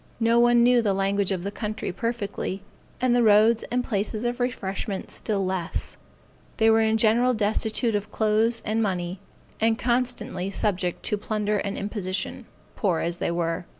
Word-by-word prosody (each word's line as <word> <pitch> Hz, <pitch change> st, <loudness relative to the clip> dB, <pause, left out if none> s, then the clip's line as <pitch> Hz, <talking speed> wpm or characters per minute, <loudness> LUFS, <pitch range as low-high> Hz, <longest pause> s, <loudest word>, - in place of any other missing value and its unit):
No 230 Hz, +1 st, +3 dB
one 240 Hz, 0 st, +5 dB
knew 245 Hz, 0 st, +5 dB
the 205 Hz, -4 st, +1 dB
language 195 Hz, 0 st, 0 dB
of 185 Hz, -2 st, -2 dB
the 200 Hz, -, -3 dB
country 215 Hz, -1 st, -4 dB
perfectly, 200 Hz, -2 st, -3 dB, 0.4 s
and 250 Hz, -1 st, +2 dB
the 245 Hz, -, +4 dB
roads 220 Hz, +1 st, +5 dB
and 245 Hz, +1 st, 0 dB
places 215 Hz, 0 st, -2 dB
of 240 Hz, +1 st, -2 dB
refreshment 200 Hz, -4 st, -3 dB
still 200 Hz, -3 st, -1 dB
less; 185 Hz, -2 st, -3 dB, 0.6 s
they 225 Hz, 0 st, +5 dB
were 225 Hz, 0 st, +4 dB
in 220 Hz, 0 st, +2 dB
general 235 Hz, +3 st, +3 dB
destitute 220 Hz, +2 st, +1 dB
of 205 Hz, 0 st, -2 dB
clothes 220 Hz, +2 st, +1 dB
and 220 Hz, +2 st, 0 dB
money, 180 Hz, -3 st, -2 dB, 0.4 s
and 225 Hz, 0 st, +2 dB
constantly 240 Hz, -6 st, -1 dB
subject 185 Hz, -3 st, -1 dB
to 210 Hz, -, +1 dB
plunder 210 Hz, -1 st, -1 dB
and 200 Hz, 0 st, -3 dB
imposition, 200 Hz, -2 st, -3 dB, 0.3 s
poor 180 Hz, -6 st, 0 dB
as 170 Hz, +1 st, -2 dB
they -, -, -1 dB
were. 170 Hz, 0 st, -2 dB
215 Hz, 165 wpm, -25 LUFS, 195-230 Hz, 0.6 s, one